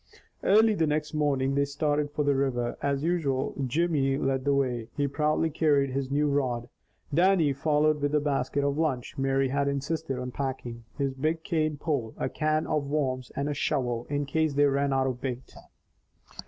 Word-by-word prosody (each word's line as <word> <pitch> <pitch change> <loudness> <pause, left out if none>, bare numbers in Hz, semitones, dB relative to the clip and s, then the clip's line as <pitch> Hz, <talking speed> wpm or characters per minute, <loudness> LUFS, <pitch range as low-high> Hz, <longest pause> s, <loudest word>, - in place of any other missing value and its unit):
Early 220 +2 +5
the 165 -6 +1
next 150 0 -1
morning 140 -3 +1
they 140 +1 +2
started 145 +1 0
for 150 0 -1
the 145 0 +3
river. 130 -3 0
As 140 0 0
usual 155 -6 0
Jimmy 140 -2 +1
led 135 -1 -1
the 140 - +3
way. 125 -4 0
He 145 -1 +1
proudly 155 +3 0
carried 145 -3 +2
his 135 0 -2
new 145 +2 +1
rod. 130 -4 -1 0.4
Dannie 170 -3 +4
followed 150 +1 +2
with 145 +1 +1
a - - +4
basket 140 -1 -1
of 140 +1 0
lunch 135 -7 -1
Mary 135 0 +1
had 140 +1 0
insisted 140 0 -2
on 125 0 -4
packing, 125 -4 -5
his 140 -2 -1
big 155 +4 -1
cane 155 -5 0
pole, 140 -7 -2
a - - -1
can 155 0 0
of 150 -3 -1
worms, 130 -4 -1
and 140 +1 -1
a 150 - -1
shovel, 120 -4 -1
in 145 0 -1
case 155 +1 0
they 145 +1 +5
ran 140 0 +1
out 135 0 +2
of 125 -2 -3
bait. 130 -1 -5
140 Hz, 185 wpm, -28 LUFS, 135-150 Hz, 0.4 s, Early